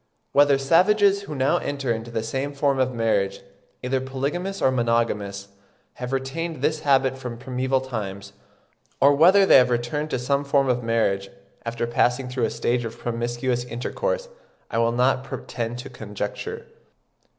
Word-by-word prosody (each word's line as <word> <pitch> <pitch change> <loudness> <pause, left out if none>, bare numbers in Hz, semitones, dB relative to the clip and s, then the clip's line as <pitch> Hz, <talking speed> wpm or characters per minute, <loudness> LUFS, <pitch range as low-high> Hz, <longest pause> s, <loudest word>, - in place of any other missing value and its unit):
Whether 145 -1 +5
savages 195 +8 +4
who 155 -7 -7
now 135 0 +2
enter 140 -4 -2
into 115 0 -4
some 135 +5 -3
form 140 -1 +1
of 130 0 +2
marriage, 100 -5 0 0.4
either 130 +1 0
polygamous 145 +9 -3
or 130 - +3
monogamous, 115 -5 -1 0.5
have 125 0 -5
retained 135 +3 -3
this 155 +1 +1
habit 135 -2 +2
from 125 -3 -6
primeval 130 +1 -1
times, 105 -7 -6 0.7
or 140 +1 +6
whether 185 +7 +6
they - - +8
have 125 -1 +5
returned 125 +6 -1
to - - -1
some 140 +3 0
form 140 -1 +2
of 125 0 +1
marriage, 110 -4 0 0.4
after 120 0 -2
passing 125 +2 +1
through 125 -2 0
a - - -1
stage 120 0 -1
of 115 0 -6
promiscuous 120 +1 -2
intercourse, - - -3 0.4
I 115 - 0
will 115 0 +3
not 125 +2 +2
pretend 120 -3 -5
to 130 +2 -8
conjecture. 120 - -5
130 Hz, 155 wpm, -24 LUFS, 115-140 Hz, 0.7 s, they